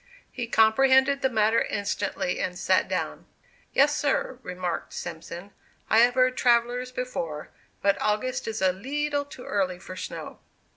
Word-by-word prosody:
He 245 Hz, -2 st, -4 dB
comprehended 265 Hz, +5 st, +4 dB
the 265 Hz, -, +2 dB
matter 220 Hz, -1 st, +3 dB
instantly 200 Hz, -3 st, -2 dB
and 180 Hz, -1 st, -2 dB
sat -, -, +2 dB
down. -, -, -3 dB, 0.4 s
"Yes, 290 Hz, +2 st, +4 dB
sir," 280 Hz, -3 st, -1 dB
remarked 180 Hz, -4 st, -4 dB
Simpson, 175 Hz, +3 st, -7 dB, 0.4 s
"I 220 Hz, -, +6 dB
have 245 Hz, +1 st, +5 dB
heard 255 Hz, 0 st, +3 dB
travellers 245 Hz, +1 st, +2 dB
before, 175 Hz, -12 st, -4 dB, 0.3 s
but 200 Hz, 0 st, +2 dB
August 230 Hz, +5 st, -1 dB
is 220 Hz, -3 st, -3 dB
a 185 Hz, -1 st, +4 dB
leetle 285 Hz, +7 st, -2 dB
too 270 Hz, -3 st, -11 dB
early 185 Hz, -3 st, -1 dB
for 185 Hz, +1 st, -10 dB
snow." 185 Hz, -, -7 dB
230 Hz, 145 wpm, -26 LUFS, 190-260 Hz, 0.4 s, I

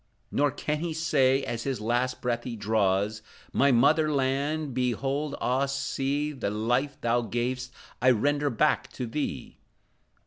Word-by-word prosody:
Nor 145 Hz, 0 st, +2 dB
can 150 Hz, +2 st, -2 dB
he 165 Hz, -1 st, -3 dB
say, 135 Hz, -4 st, +2 dB
as 115 Hz, -1 st, -3 dB
his 135 Hz, +1 st, -2 dB
last 120 Hz, +4 st, -1 dB
breath 120 Hz, -1 st, -1 dB
he 120 Hz, -, -5 dB
draws, 105 Hz, 0 st, +1 dB, 0.3 s
"My 140 Hz, +1 st, +4 dB
mother 155 Hz, +6 st, +4 dB
land, 140 Hz, +2 st, 0 dB
beloved, 135 Hz, +4 st, -1 dB
ah 130 Hz, +2 st, +1 dB
see, 140 Hz, +2 st, -1 dB
The 130 Hz, -8 st, -3 dB
life 125 Hz, +7 st, 0 dB
thou 120 Hz, +1 st, +2 dB
gav'st, 125 Hz, +3 st, -2 dB, 0.3 s
I 130 Hz, -, +5 dB
render 145 Hz, +5 st, +2 dB
back 150 Hz, +5 st, +1 dB
to 125 Hz, -, -4 dB
thee!" 140 Hz, +6 st, -4 dB
130 Hz, 145 wpm, -27 LUFS, 120-145 Hz, 0.3 s, I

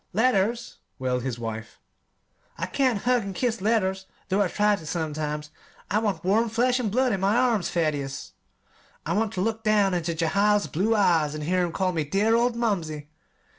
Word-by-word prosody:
"Letters!" 230 Hz, +1 st, +1 dB, 0.2 s
wailed 125 Hz, -1 st, -1 dB
his 125 Hz, -1 st, -3 dB
wife. 110 Hz, -1 st, -6 dB, 0.8 s
"I -, -, -2 dB
can't 255 Hz, -7 st, 0 dB
hug 250 Hz, 0 st, +3 dB
an' 195 Hz, -2 st, -6 dB
kiss 235 Hz, -3 st, -1 dB
letters, 190 Hz, -3 st, 0 dB, 0.2 s
though 195 Hz, +2 st, +2 dB
I 200 Hz, -, +3 dB
try 210 Hz, +3 st, +2 dB
to, 165 Hz, -, -10 dB
sometimes. 150 Hz, -2 st, -3 dB, 0.4 s
I 210 Hz, -, +3 dB
want 210 Hz, -3 st, -2 dB
warm 220 Hz, +5 st, +2 dB
flesh 245 Hz, +3 st, +1 dB
an' 235 Hz, -4 st, -1 dB
blood 255 Hz, +4 st, +2 dB
in 195 Hz, -, 0 dB
my 195 Hz, +3 st, +2 dB
arms, 235 Hz, -7 st, +2 dB
Thaddeus; 145 Hz, -5 st, -2 dB, 0.7 s
I -, -, -1 dB
want 220 Hz, +1 st, 0 dB
ter 185 Hz, -, -2 dB
look 220 Hz, +2 st, -1 dB
down 210 Hz, -3 st, +3 dB
into 170 Hz, -1 st, -1 dB
Jehiel's 200 Hz, +6 st, +2 dB
blue 205 Hz, +8 st, 0 dB
eyes 165 Hz, -7 st, +2 dB
an' 155 Hz, -, -5 dB
hear 180 Hz, +4 st, +1 dB
him 175 Hz, -, -2 dB
call 185 Hz, +2 st, 0 dB
me 160 Hz, -3 st, -1 dB
'dear 200 Hz, +9 st, +1 dB
old 240 Hz, +1 st, +2 dB
mumsey!' 165 Hz, -11 st, -2 dB
195 Hz, 185 wpm, -25 LUFS, 160-225 Hz, 0.8 s, hug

